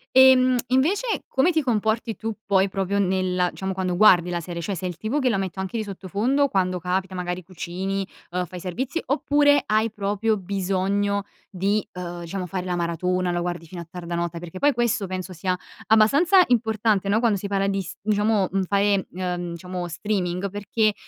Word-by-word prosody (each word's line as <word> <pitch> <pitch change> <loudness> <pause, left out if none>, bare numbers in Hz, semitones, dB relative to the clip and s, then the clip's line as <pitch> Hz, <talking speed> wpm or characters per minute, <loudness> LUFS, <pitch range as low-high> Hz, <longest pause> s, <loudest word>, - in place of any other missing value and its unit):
Ehm, 260 -1 +7
invece 345 - +1
come 270 +7 +3
ti 315 - +2
comporti 220 -2 0
tu 225 -1 -4
poi 195 0 +3
proprio 195 +1 -1
nella 185 -1 +1
diciamo 190 0 -4
quando 185 -1 -1
guardi 180 -3 +6
la 175 -1 -2
serie? 170 0 -6
Cioè 195 +4 -3
sei 180 +1 -3
il 175 - -7
tipo 220 +10 -1
che 260 -3 +2
la 220 - +1
metto 190 0 -3
anche 190 +5 -4
di 220 - -1
sottofondo, 210 +9 0
quando 185 -2 0
capita, 185 +2 -2
magari 180 0 -3
cucini, 190 +2 -4 0.3
uhm, 180 0 -1
fai 180 +1 -9
servizi, 250 - -3
oppure 290 +1 +3
hai 215 +1 +2
proprio 210 +1 0
bisogno 195 +1 -1 0.3
di, 200 +3 0
uhm, 175 -1 -6
diciamo 180 +2 -4
fare 180 +1 -4
la 180 -1 -1
maratona, 180 +1 0
la 175 - -1
guardi 175 -1 -3
fino 175 +1 -8
a 170 - -10
tarda 170 -1 -5
notte? 170 0 -2
Perché 175 +2 -8
poi 290 0 +4
questo 230 -4 0
penso 185 0 -5
sia 180 +1 -2 0.3
abbastanza 285 - +5
importante, 220 -4 +1
no, 205 +2 +3
quando 225 -4 +2
si 200 - -5
parla 195 0 0
di 195 0 0
s 175 - -8
diciamo, 210 -1 +1
mhmm, 195 0 +1
fare, 200 +1 +1
uhm, 180 -1 -3
diciamo 180 +1 -5
streaming, 180 +1 -2
perché 205 +2 0
195 Hz, 190 wpm, -24 LUFS, 180-220 Hz, 0.3 s, Ehm